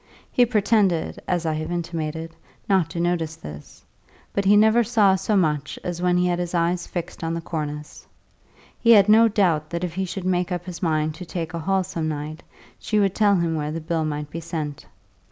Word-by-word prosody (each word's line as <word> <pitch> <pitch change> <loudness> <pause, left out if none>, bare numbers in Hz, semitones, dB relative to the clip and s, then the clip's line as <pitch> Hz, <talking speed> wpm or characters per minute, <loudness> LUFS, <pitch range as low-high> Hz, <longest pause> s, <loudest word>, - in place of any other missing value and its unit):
He 245 -1 +4
pretended, 205 -6 +1
as 175 -2 0
I 160 - +1
have 155 +2 -4
intimated, 165 -1 -4 0.3
not 190 -5 +2
to 170 - -5
notice 170 -2 0
this; 75 - -11 0.5
but 200 - 0
he 205 +2 +6
never 220 +3 +5
saw 215 -4 +4
so 200 +2 +1
much 150 -5 0
as 175 -1 -4
when 180 0 +2
he 180 - +2
had 175 -1 0
his 175 0 -3
eyes 170 +1 0
fixed 175 -1 -6
on 165 0 -1
the - - -2
cornice. 150 -3 -6 0.7
He 230 - +1
had 200 -2 +6
no 225 +2 +7
doubt 175 -8 +1
that 170 +1 -3
if 175 -2 -3
he 190 +2 -2
should 185 0 -5
make 180 0 0
up 175 -1 -3
his 175 -3 -7
mind 155 -2 0
to 180 +4 -9
take 170 -1 -4
a 170 - -3
hall 190 +3 +1
some 170 -3 -3
night, 155 +1 -5 0.4
she 215 - 0
would 195 -2 +2
tell 205 -1 +3
him 170 -2 0
where 150 -1 -2
the 165 - -3
bill 160 0 -1
might 150 -1 -4
be 165 - -4
sent. 155 -3 -5
170 Hz, 210 wpm, -23 LUFS, 160-190 Hz, 0.7 s, no